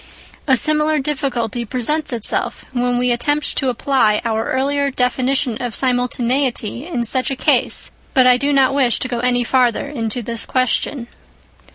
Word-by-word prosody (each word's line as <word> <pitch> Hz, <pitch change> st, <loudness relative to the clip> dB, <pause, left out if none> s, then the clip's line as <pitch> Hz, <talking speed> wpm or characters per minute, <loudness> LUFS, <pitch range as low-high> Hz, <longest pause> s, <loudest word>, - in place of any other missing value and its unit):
A 265 Hz, -, +5 dB
similar 305 Hz, +3 st, +2 dB
difficulty 265 Hz, -5 st, -2 dB
presents 270 Hz, +6 st, -1 dB
itself 230 Hz, -3 st, -2 dB
when 245 Hz, -1 st, 0 dB
we 250 Hz, 0 st, +1 dB
attempt 290 Hz, +5 st, -1 dB
to 265 Hz, -, +2 dB
apply 240 Hz, -4 st, +1 dB
our 225 Hz, -1 st, -1 dB
earlier 280 Hz, +2 st, 0 dB
definition 255 Hz, -1 st, 0 dB
of 245 Hz, -3 st, -3 dB
simultaneity 250 Hz, 0 st, 0 dB
in 280 Hz, -9 st, -2 dB
such 255 Hz, +3 st, +1 dB
a 270 Hz, -, -2 dB
case, -, -, +1 dB, 0.2 s
but 260 Hz, -1 st, +5 dB
I 250 Hz, 0 st, +6 dB
do 280 Hz, +3 st, 0 dB
not 270 Hz, -1 st, +3 dB
wish 260 Hz, -4 st, +2 dB
to -, -, -1 dB
go 245 Hz, -2 st, -3 dB
any 245 Hz, 0 st, +1 dB
farther 250 Hz, 0 st, +1 dB
into 240 Hz, -4 st, -4 dB
this 230 Hz, +1 st, -1 dB
question. 255 Hz, 0 st, 0 dB
255 Hz, 160 wpm, -18 LUFS, 240-275 Hz, 0.2 s, I